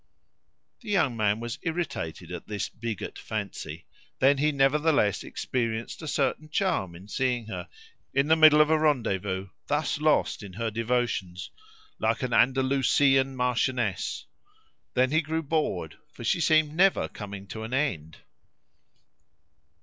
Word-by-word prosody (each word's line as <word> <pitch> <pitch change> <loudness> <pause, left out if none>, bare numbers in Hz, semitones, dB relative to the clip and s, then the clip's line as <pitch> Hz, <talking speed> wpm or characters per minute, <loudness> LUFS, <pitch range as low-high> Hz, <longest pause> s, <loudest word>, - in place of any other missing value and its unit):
The 225 - -11
young 175 - +2
man 105 -1 +1
was 120 +3 -5
irritated 165 - -4
at - - -7
this 105 -1 -3
bigot 110 -2 -6
fancy; 100 -7 -5 0.3
then 135 +1 +4
he 150 +2 +3
nevertheless 140 - +2
experienced 115 0 -3
a 160 - -6
certain 155 +1 -1
charm 150 - 0
in 95 +4 -12
seeing 125 +1 -1
her, 110 - -6 0.4
in 140 +1 +2
the 160 - +5
middle 155 -1 +7
of 150 +1 +3
a 160 - +4
rendezvous, 100 -10 0 0.2
thus 145 0 0
lost 155 -5 +2
in 100 -3 -9
her 115 +2 -3
devotions, 115 -5 -2 0.5
like 115 +3 0
an 125 -2 -2
Andalusian 135 +1 +3
marchioness; 125 -4 -1 0.7
then 130 +1 +3
he 160 +1 +3
grew 160 +1 -2
bored, 140 - -2
for - - -10
she - - +1
seemed 155 -1 +3
never 190 +4 +3
coming 100 -2 -8
to 110 - -6
an 110 +2 -6
end. 80 - -2
130 Hz, 140 wpm, -27 LUFS, 110-150 Hz, 0.7 s, middle